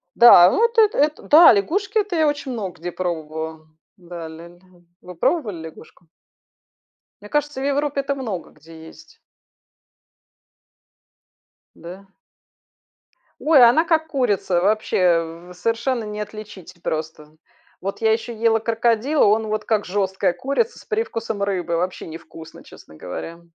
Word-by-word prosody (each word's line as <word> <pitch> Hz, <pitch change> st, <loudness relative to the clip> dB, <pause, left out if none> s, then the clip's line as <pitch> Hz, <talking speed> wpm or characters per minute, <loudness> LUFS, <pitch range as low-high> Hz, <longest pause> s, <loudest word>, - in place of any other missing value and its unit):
Да, 180 Hz, -7 st, +8 dB
вот 465 Hz, +1 st, +1 dB
это, 430 Hz, -1 st, +4 dB
эт 300 Hz, +1 st, +2 dB
да, 315 Hz, -3 st, +8 dB
лягушки, 390 Hz, -, -1 dB
это 405 Hz, -4 st, -2 dB
я 315 Hz, -2 st, +2 dB
очень 285 Hz, -2 st, -3 dB
много 195 Hz, -9 st, -6 dB
где 175 Hz, +1 st, -5 dB
пробовала. 160 Hz, -2 st, -5 dB, 0.3 s
Да, 170 Hz, -2 st, -9 dB
ля 160 Hz, +2 st, -11 dB
ля. 175 Hz, 0 st, -19 dB, 0.4 s
Вы 180 Hz, -1 st, -11 dB
пробовали 210 Hz, -, -1 dB
лягушку? 160 Hz, +1 st, -16 dB, 1.1 s
Мне 210 Hz, -, -12 dB
кажется, 295 Hz, -2 st, -2 dB
в 275 Hz, -, -2 dB
Европе 285 Hz, 0 st, 0 dB
это 275 Hz, 0 st, -3 dB
много 215 Hz, -11 st, -6 dB
где 160 Hz, +1 st, -15 dB
есть. -, -, -17 dB, 2.6 s
Да? 185 Hz, +4 st, -11 dB, 1.3 s
Ой, 295 Hz, -5 st, +5 dB
она 245 Hz, +7 st, +5 dB
как 320 Hz, -1 st, +1 dB
курица, 205 Hz, -, 0 dB
вообще 175 Hz, -4 st, 0 dB
совершенно 230 Hz, +6 st, -2 dB
не 210 Hz, 0 st, -6 dB
отличить 210 Hz, -4 st, -9 dB
просто. 155 Hz, -1 st, -5 dB, 0.5 s
Вот 195 Hz, +4 st, -5 dB
я 220 Hz, -, +3 dB
еще 230 Hz, +1 st, -2 dB
ела 225 Hz, 0 st, +2 dB
крокодила, 230 Hz, +5 st, +1 dB
он 215 Hz, +2 st, +2 dB
вот 215 Hz, 0 st, -2 dB
как 215 Hz, -3 st, 0 dB
жесткая 190 Hz, -1 st, -1 dB
курица 280 Hz, -, -2 dB
с -, -, -17 dB
привкусом 230 Hz, -, -3 dB
рыбы, 180 Hz, -4 st, -2 dB
вообще 180 Hz, +1 st, -3 dB
не 160 Hz, -, -7 dB
вкусно, 160 Hz, -1 st, -14 dB
честно 80 Hz, -, -16 dB
говоря. 165 Hz, -, -8 dB
210 Hz, 140 wpm, -21 LUFS, 175-270 Hz, 2.6 s, Да